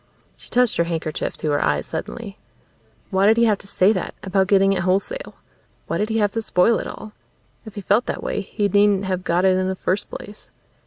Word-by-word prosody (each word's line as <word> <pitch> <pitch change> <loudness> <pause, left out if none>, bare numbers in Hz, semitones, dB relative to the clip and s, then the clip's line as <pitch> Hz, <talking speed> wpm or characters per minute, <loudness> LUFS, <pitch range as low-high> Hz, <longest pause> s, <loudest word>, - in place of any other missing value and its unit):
She - - -14
touched 250 -1 +2
her 170 - +2
handkerchief 165 -2 -3
to 155 - -2
her 145 - +1
eyes 75 +1 0
suddenly. - - -6 0.7
Why 190 +1 +3
did 220 +2 +5
he 235 - +5
have 210 -3 +2
to - - -13
say 200 +1 +3
that, 185 - -4
about 190 0 +1
getting 195 0 +4
it 185 - -1
wholesale? 195 - -1 0.5
Why - - -2
did 210 +1 -1
he 225 - 0
have 205 -2 +2
to 225 - -2
spoil 220 +2 +2
it - - -5
all? 215 0 -9 0.5
If 215 - -10
he 205 - -5
felt 205 +5 +1
that - - -4
way - - -2
he 205 +1 -2
needn't 200 0 +3
have 185 -1 -2
got 175 +2 +1
it 190 -1 +4
in 185 0 0
the 190 - -2
first 185 +1 -2
place. 205 +1 -9
195 Hz, 225 wpm, -22 LUFS, 185-210 Hz, 0.7 s, did